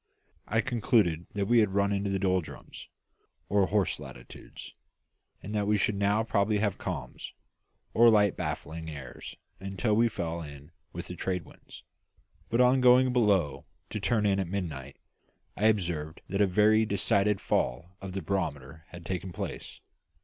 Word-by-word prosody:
I 110 +2 +2
concluded 110 -9 +1
that 100 -1 0
we 120 +3 +4
had 100 -3 +2
run 100 0 +2
into 100 0 -1
the 100 - 0
doldrums, 95 -3 -3 0.6
or 100 -2 +3
horse 105 -4 0
latitudes, - - -11 0.7
and 105 - -6
that 105 -1 0
we 105 0 +3
should 105 - +1
now 100 +2 +1
probably 105 -1 +1
have 100 -2 -1
calms, 70 -10 -6 0.6
or 120 +1 +7
light 105 -3 +4
baffling 80 0 -5
airs 70 -5 -9 0.2
until 95 +3 -1
we 115 +2 +4
fell 85 -5 -4
in 75 0 -11 0.2
with - - -6
the - - -7
trade 90 -3 -3
winds; - - -15 0.7
but 115 - 0
on 125 +1 +5
going 125 0 +5
below 100 - +1 0.2
to 105 - -3
turn 110 +1 +1
in 100 -1 +2
at 95 - -1
midnight, 80 -8 -5 0.6
I 105 - -1
observed 85 -7 -1
that 100 +2 0
a 100 - +5
very 105 +4 +4
decided 100 -1 +2
fall 85 +10 -1
of 95 -1 -7
the 95 -2 -4
barometer 80 -5 -3
had 85 -1 -11
taken 90 +1 -4
place. - - -7
100 Hz, 160 wpm, -29 LUFS, 85-105 Hz, 0.7 s, or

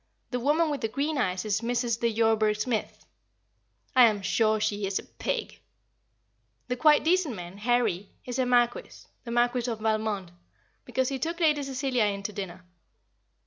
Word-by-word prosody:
The 250 - -1
woman 300 +5 +2
with 285 - -3
the 225 - 0
green 280 +5 -2
eyes 185 -4 -1
is 210 0 0
Mrs. 235 -1 -1
de 235 - +2
Yorburgh 220 -1 +2
Smith. 225 -1 -3 0.9
I 250 -2 +8
am 205 -3 -1
sure 215 +1 +2
she 210 -1 -1
is 195 - -1
a - - -4
pig. - - -4 1.1
The 250 - 0
quite 300 +3 +5
decent 330 -5 +2
man, 180 +1 -9
"Harry," 215 -5 +1 0.2
is 250 +1 -4
a 255 - +2
Marquis 240 -1 +1 0.2
the - - -7
Marquis 240 +1 +1
of 225 -2 -3
Valmond 215 -4 -1 0.5
because 260 -1 0
he 270 -1 -3
took 335 +4 -3
Lady 305 -3 +3
Cecilia 265 -4 0
in 200 -1 -2
to 210 0 -4
dinner. 185 -2 -7
235 Hz, 170 wpm, -27 LUFS, 210-260 Hz, 1.1 s, I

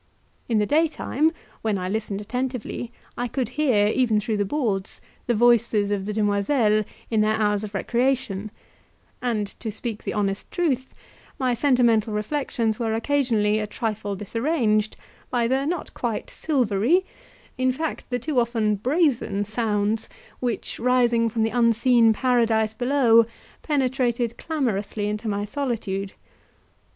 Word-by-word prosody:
In 225 - +2
the 210 - +3
daytime, 310 +1 +1 0.3
when 215 -3 0
I 185 -1 -3
listened 205 0 -3
attentively, 245 +1 -4 0.3
I 245 - 0
could 255 +1 -2
hear, 255 -9 +2
even 220 0 +2
through 215 +1 -2
the 205 - +2
boards, 200 -6 -1 0.3
the 240 - +2
voices 230 -3 +3
of 195 -2 -1
the - - -1
demoiselles 210 +1 +2 0.3
in 220 -1 +3
their 215 0 +2
hours 210 -1 +1
of 205 -1 -6
recreation, 235 -2 0 0.7
and, 230 -4 0
to 220 - -4
speak 220 0 -5
the - - -4
honest 195 -1 -1
truth, 270 -7 -1 0.4
my 255 -2 +1
sentimental 235 -4 +3
reflections 225 -1 -1
were 225 -2 0
occasionally 225 -5 +1
a 210 - -2
trifle 215 -2 -3
disarranged 220 - 0 0.3
by 240 -2 +1
the 265 +3 +1
not 350 +2 -3
quite 235 -3 -3
silvery, 265 - +1 0.5
in 255 0 +3
fact 315 +5 -4
the 245 - 0
too 265 +2 0
often 225 -3 +1
brazen 255 - +1
sounds, 215 0 -1 0.3
which, 245 -2 -3
rising 240 -2 +3
from 225 0 0
the 225 - +1
unseen 235 0 +4
paradise 225 -2 +2
below, 245 -2 +4 0.3
penetrated 255 -5 0
clamorously 215 -9 -2
into 210 +2 -3
my 205 -1 -1
solitude. 210 -6 -3
230 Hz, 140 wpm, -24 LUFS, 210-255 Hz, 0.7 s, unseen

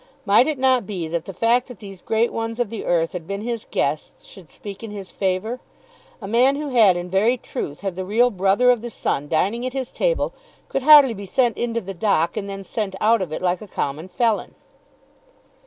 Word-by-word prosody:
Might 210 +6 +5
it 310 -2 -1
not 255 -5 +2
be 180 -6 -4
that 170 0 -3
the - - -6
fact 230 +6 +1
that 250 -4 -11
these 195 -3 -11
great 225 +2 0
ones 225 +1 -4
of 240 -4 -1
the 225 - -5
earth 165 -1 +1
had 170 -3 -6
been 200 0 -4
his 235 -1 -4
guests 150 +2 -2
should 175 -8 -14
speak 200 +4 -9
in 225 - -7
his 200 -2 -8
favour? 195 +6 -2 0.6
A - - -5
man 245 +6 +3
who 295 0 -4
had 220 -8 +5
in 175 0 -4
very 205 +7 +2
truth 145 -9 -6
had 195 -3 -3
the 185 - -4
real 230 +6 +2
brother 200 +5 +3
of 245 -3 0
the 240 - -5
Sun 145 -9 -2
dining 200 +10 0
at 255 0 -3
his 265 -2 -4
table - - 0 0.4
could 270 - -1
hardly 285 -3 +8
be 200 -2 -8
sent 240 +2 +1
into 230 -1 -2
the 195 0 -7
dock 170 -4 +1
and 200 -2 -4
then 195 0 -6
sent 195 -1 -4
out 225 0 +3
of 180 -5 -4
it 155 - -5
like 180 +1 0
a 215 - -9
common 150 -1 -4
felon. 225 +2 -1
210 Hz, 220 wpm, -22 LUFS, 185-240 Hz, 0.6 s, hardly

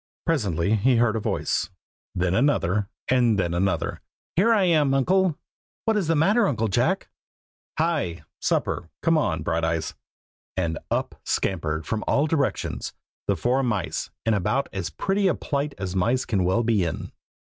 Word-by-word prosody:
Presently 105 - +1
he 125 +5 +3
heard 115 -1 +3
a - - 0
voice, 105 - -1 0.5
then 90 0 +1
another, 105 - +2 0.2
and 120 -4 +3
then 85 -3 0
another. 95 +2 0 0.3
"Here 205 +7 +4
I 215 -4 +4
am, 150 -6 +3
Uncle!" 180 +4 +2 0.5
"What 225 - +2
is 200 -6 0
the 165 - +3
matter, 200 +8 +4
Uncle 115 - 0
Jack?" 95 - +1 0.7
"Hi! 155 - 0 0.2
supper! 80 - -1
come 165 -1 +4
on, 90 - 0
Brighteyes!" 80 -1 -1 0.6
and 85 -4 -1
up - - -2
scampered 80 -4 -1
from 110 -1 -2
all 140 - +3
directions, 150 -3 -1 0.3
the - - +2
four 125 +2 +1
mice 105 -9 -2 0.2
in 115 - +3
about 125 +8 0
as - - -3
pretty 195 0 0
a 185 - +2
plight 140 0 -2
as 95 -1 -4
mice 120 +8 +1
can 100 -5 +1
well 95 +6 +2
be 110 -4 +2
in. 85 - -4
115 Hz, 160 wpm, -25 LUFS, 95-150 Hz, 0.7 s, Here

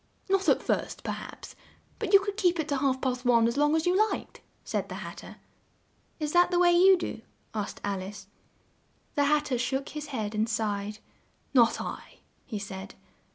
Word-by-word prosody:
"Not 390 0 +3
at - - +3
first, - - -2
per - - -2
haps, - - -8 0.4
but - - -2
you 395 - +9
could 405 0 -3
keep 355 -5 +2
it 315 - -1
to 285 - +1
half 265 -1 +1
past 250 -2 -1
one 235 -2 +4
as 235 - -1
long 295 +2 +3
as 320 - +1
you 355 +1 +3
liked," - - -6 0.2
said - - -3
the - - -5
Hat - - -7
ter. - - -10 0.8
"Is 300 -1 -2
that 350 0 +5
the 355 - +1
way 350 0 +5
you 370 +2 +7
do?" 350 - -5 0.3
asked 210 -2 -4
Al 200 -2 -2
ice. 200 +2 -8 0.9
The 285 -2 +2
Hat 300 +1 +3
ter 255 -4 -1
shook 265 +2 -1
his 300 0 -6
head 220 -7 -3
and 215 +1 0
sighed. 210 -2 -2 0.6
"Not 235 -3 +5
I," - - -7 0.3
he 220 - -4
said. 195 -1 -7
270 Hz, 200 wpm, -28 LUFS, 220-335 Hz, 0.9 s, you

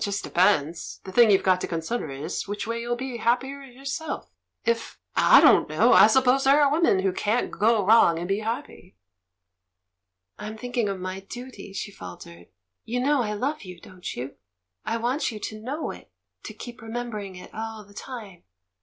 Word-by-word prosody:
"It - - +1
just 200 -1 -2
depends... 170 -3 +1
the 190 - -8
thing 235 +2 +6
you've 195 -2 +4
got 185 -1 +3
to - - -2
consider 165 +2 -3
is 145 +9 -4
which 205 0 -4
way 230 +1 -3
you'll 240 +1 -1
be 255 0 -5
happier 260 +5 0
yourself. 275 +4 -6 0.3
If 230 0 -1
— - - -45 0.2
I - - +11
don't - - +6
know! - - +4
I - - +9
suppose 265 0 +4
there 275 +2 +6
are 285 -2 +4
women 300 - +3
who 190 -1 +1
cant 215 +5 0
go 215 -1 +2
wrong 210 -6 +6
and 170 +1 -4
be 195 +2 0
happy." 225 -4 -5 1.4
"I'm 215 +1 -6
thinking 245 -2 -1
of 195 -1 -3
my 185 +1 -4
duty," 245 +1 -9
she 200 +1 -5
faltered. 85 - -11 0.4
"You 245 +2 -2
know 280 +1 +2
I 210 -3 -2
love 275 +9 -2
you, 180 -3 -10
don't 180 -1 -8
you? 130 +3 -6 0.5
I 225 +2 -1
want 245 +5 -1
you 215 - -7
to 215 +1 -6
know 275 +8 -3
it, - - -12 0.4
to - - -7
keep 240 -2 -9
remembering 225 -4 -5
it 180 - -12
all 220 -1 -6
the 200 - -18
time. 210 -6 -9
220 Hz, 190 wpm, -25 LUFS, 190-245 Hz, 1.4 s, I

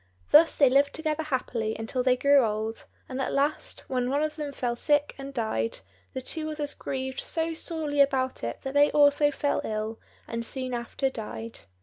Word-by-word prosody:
Thus 325 +1 +7
they 280 - +6
lived 280 +2 +3
together 315 0 -1
happily 245 -7 -2
until 225 +3 -2
they 255 0 +3
grew 280 +2 +5
old; 220 0 -2 0.2
and 260 0 -4
at - - -1
last, 285 +2 -1
when 250 -1 -2
one 285 +3 +1
of 305 0 -2
them 300 -2 -4
fell 245 -3 -2
sick 290 +3 +2
and 275 0 -6
died, 220 - -2 0.3
the 260 - -3
two 310 +3 -3
others 295 -2 -3
grieved 265 0 -4
so 330 0 -1
sorely 315 -3 -1
about 260 - +1
it 115 0 -4
that 270 - -4
they 290 +1 +5
also 290 0 +5
fell 285 0 0
ill, 215 +1 -3 0.3
and 230 0 -3
soon 255 +1 -4
after 245 +3 -2
died. 225 -1 -7
270 Hz, 190 wpm, -27 LUFS, 240-290 Hz, 0.3 s, Thus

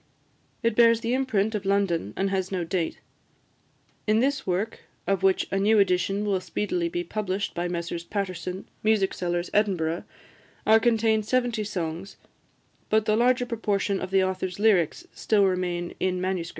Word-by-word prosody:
It 230 -1 +1
bears 230 -1 +5
the 230 +1 -1
imprint 225 -5 +1
of 210 -2 -2
London, 195 - 0
and 195 0 0
has 190 -1 -1
no 185 -2 -1
date. 170 -1 -2 1.1
In 215 +1 +4
this 275 +1 0
work, 190 +5 -1 0.3
of 195 -2 0
which 190 -1 +3
a 195 - +1
new 215 +3 +4
edition 195 +1 +2
will 195 -3 0
speedily 180 -1 -2
be 175 +1 -2
published 200 +1 -3
by 175 +1 -2
Messrs 170 -1 -4
Paterson, 185 -1 -4
music 215 -3 +2
sellers, 175 0 -2
Edinburgh, 180 -6 +1 0.6
are 220 +1 +6
contained 220 -2 +2
seventy 245 -3 +1
songs, 180 -1 -5 0.7
but 220 0 +3
the 215 - +2
larger 245 +2 +3
proportion 205 -4 -1
of 185 - -4
the 190 0 +3
author's 185 -1 -2
lyrics 205 - +2
still 205 -2 +2
remain 180 -2 -1
in 185 -1 0
MS. 185 -2 -2
195 Hz, 160 wpm, -26 LUFS, 180-215 Hz, 1.1 s, are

